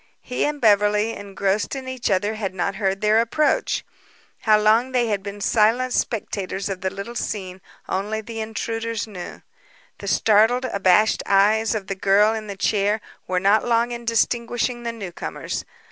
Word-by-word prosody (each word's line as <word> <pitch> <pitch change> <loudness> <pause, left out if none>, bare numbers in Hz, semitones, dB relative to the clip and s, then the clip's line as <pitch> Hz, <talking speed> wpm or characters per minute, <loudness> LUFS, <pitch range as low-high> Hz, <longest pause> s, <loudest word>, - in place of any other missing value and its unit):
He 250 - -1
and 295 0 -2
Beverly, 210 0 +3
engrossed 200 +3 -2
in 265 -1 -6
each 260 -2 -3
other, 205 +2 +1
had 200 -4 -4
not 190 +2 -2
heard 195 -1 -1
their 215 +1 +4
approach. 295 +6 0 0.5
How 215 -1 +4
long 225 +5 +3
they 240 -2 +2
had 205 -2 0
been 200 +1 -7
silent 230 +5 +2
spectators 200 -3 -2
of 190 -2 -4
the 190 - 0
little 200 +5 -7
scene 190 -5 -4 0.3
only 205 +3 -2
the 225 +1 -7
intruders 225 0 -3
knew. 190 -5 -9 0.6
The - - -8
startled, 225 +4 +3
abashed 200 -1 +3
eyes 215 +3 +3
of 205 -3 -3
the 195 - -3
girl 200 +3 +3
in 220 -1 -5
the 200 -1 -6
chair 205 +2 +1 0.3
were 185 0 0
not 200 +3 +3
long 235 0 +1
in 240 0 -5
distinguishing 240 +1 0
the 235 -1 -3
newcomers. 195 -7 -5
215 Hz, 165 wpm, -22 LUFS, 200-230 Hz, 0.6 s, their